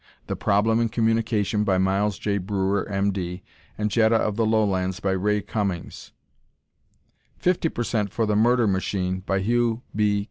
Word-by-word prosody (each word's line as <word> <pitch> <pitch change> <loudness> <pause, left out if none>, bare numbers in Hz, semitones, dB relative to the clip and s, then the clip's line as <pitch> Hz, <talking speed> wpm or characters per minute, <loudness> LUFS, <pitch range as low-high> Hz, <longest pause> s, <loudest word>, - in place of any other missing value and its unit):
"The - - -3
Problem 105 +3 +2
in 115 -1 +1
Communication," 110 -2 +1
by 95 -3 +2
Miles 95 +2 +1
J. 100 -1 -1
Breuer, 100 +1 -1
M. 100 0 +1
D. 90 -1 -5 0.3
and 105 0 -1
"Jetta 115 0 +3
of 105 -2 +1
the 115 0 +1
Lowlands," 95 -4 +1
by 100 -2 -1
Ray 105 +2 +1
Cummings; 100 -3 -4 1.3
50% 120 - 0
for 115 +4 -1
"The 105 -1 0
Murder 120 +2 +3
Machine," 95 -1 -1
by 95 +1 -1
Hugh 120 +2 0
B. 105 - +1
105 Hz, 150 wpm, -24 LUFS, 95-110 Hz, 1.3 s, Jetta